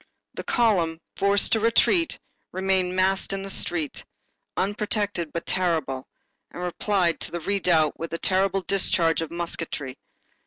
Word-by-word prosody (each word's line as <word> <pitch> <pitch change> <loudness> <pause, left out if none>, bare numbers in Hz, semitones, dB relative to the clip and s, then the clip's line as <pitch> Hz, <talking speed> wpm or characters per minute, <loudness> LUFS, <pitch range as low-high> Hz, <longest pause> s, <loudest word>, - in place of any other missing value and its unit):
The - - -6
column, 180 -9 +1 0.2
forced 200 +1 +2
to 225 - +3
retreat, 230 - +3 0.3
remained 185 -1 0
massed 190 +1 +1
in 195 0 -3
the 195 - 0
street, 165 -5 +2 0.5
unprotected 205 -4 -1
but 170 - -5
terrible, 160 -8 -1 0.4
and 180 - -7
replied 180 -1 0
to - - -4
the 175 - -4
redoubt 170 -4 +1
with 165 - -5
a 165 - -2
terrible 190 +2 +1
discharge 175 -4 +2
of 165 - -4
musketry. 165 -5 -5
185 Hz, 140 wpm, -25 LUFS, 165-195 Hz, 0.5 s, to